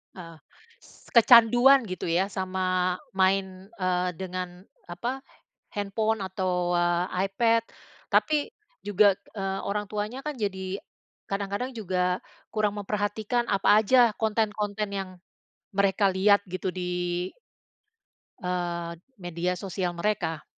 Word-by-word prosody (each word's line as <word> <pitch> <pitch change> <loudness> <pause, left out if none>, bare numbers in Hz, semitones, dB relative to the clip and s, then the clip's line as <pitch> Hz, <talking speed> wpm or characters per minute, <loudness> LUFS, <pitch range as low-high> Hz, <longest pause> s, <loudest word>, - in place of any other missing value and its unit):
Heeh. 165 -3 -10 0.4
S - - -20
kecanduan 240 +3 +7
gitu 185 - -4
ya, 180 +4 +1
sama 185 -1 0 0.2
main, 190 0 +1
eee, 180 0 +1
dengan, 180 0 -6 0.2
apa, 235 +10 -4 0.5
handphone 215 +2 -1
atau, 185 -2 -1
eee, 175 +2 +1
iPad, 230 +3 +2 0.5
tapi 305 +5 +2 0.3
juga, 205 -1 +4 0.2
eee, 195 -1 -2
orang 205 +1 -1
tuanya 210 +4 -3
kan 300 -2 -4
jadi 190 -2 -3 0.5
kadang-kadang 200 +6 -3
juga 180 -4 -1 0.3
kurang 210 -1 0
memperhatikan 210 +3 -1
apa 205 +2 +5
aja 240 0 +5
konten-konten 210 -1 -1
yang, 195 -1 -3 0.6
mereka 200 0 +2
lihat 200 +2 +4
gitu, 185 0 -3
di, 180 0 -2 1.1
eee, 175 -2 -2 0.3
media 175 +1 -2
sosial 185 -1 -3
mereka. 170 -4 -1
195 Hz, 110 wpm, -27 LUFS, 180-210 Hz, 1.1 s, kecanduan